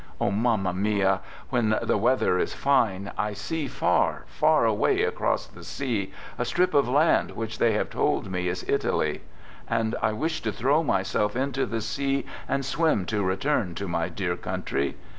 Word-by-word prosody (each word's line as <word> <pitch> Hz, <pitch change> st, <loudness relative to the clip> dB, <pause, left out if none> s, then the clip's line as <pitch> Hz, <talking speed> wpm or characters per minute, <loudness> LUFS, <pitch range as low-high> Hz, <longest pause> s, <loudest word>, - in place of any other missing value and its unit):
Oh, -, -, +1 dB
Mamma 105 Hz, -3 st, +1 dB
mia, 95 Hz, -1 st, +1 dB, 0.3 s
when 110 Hz, -4 st, +2 dB
the -, -, 0 dB
weather 105 Hz, -4 st, +2 dB
is -, -, -1 dB
fine, 105 Hz, -8 st, +1 dB
I 105 Hz, 0 st, 0 dB
see 145 Hz, +9 st, -3 dB
far, -, -, +1 dB
far -, -, +3 dB
away -, -, +2 dB
across -, -, 0 dB
the -, -, -14 dB
sea, 115 Hz, -8 st, -3 dB, 0.3 s
a -, -, +2 dB
strip 175 Hz, +9 st, +1 dB
of 140 Hz, -4 st, +3 dB
land 150 Hz, +5 st, +3 dB
which 110 Hz, -1 st, -5 dB
they 115 Hz, -2 st, +4 dB
have 105 Hz, -, -1 dB
told -, -, 0 dB
me 90 Hz, -1 st, -1 dB
is 90 Hz, +1 st, -3 dB
Italy, -, -, 0 dB, 0.5 s
and 115 Hz, -1 st, 0 dB
I 110 Hz, 0 st, +1 dB
wished 160 Hz, +7 st, -2 dB
to 110 Hz, -, +1 dB
throw 135 Hz, +9 st, +2 dB
myself 105 Hz, -, 0 dB
into 135 Hz, +1 st, 0 dB
the 115 Hz, -1 st, -2 dB
sea 135 Hz, +4 st, -1 dB, 0.2 s
and 140 Hz, -1 st, 0 dB
swim 135 Hz, -, +1 dB
to 105 Hz, -, +1 dB
return 95 Hz, -, 0 dB
to 100 Hz, +3 st, -4 dB
my 85 Hz, -1 st, -1 dB
dear 90 Hz, 0 st, -2 dB
country. 70 Hz, -4 st, -2 dB
110 Hz, 175 wpm, -26 LUFS, 95-135 Hz, 0.5 s, they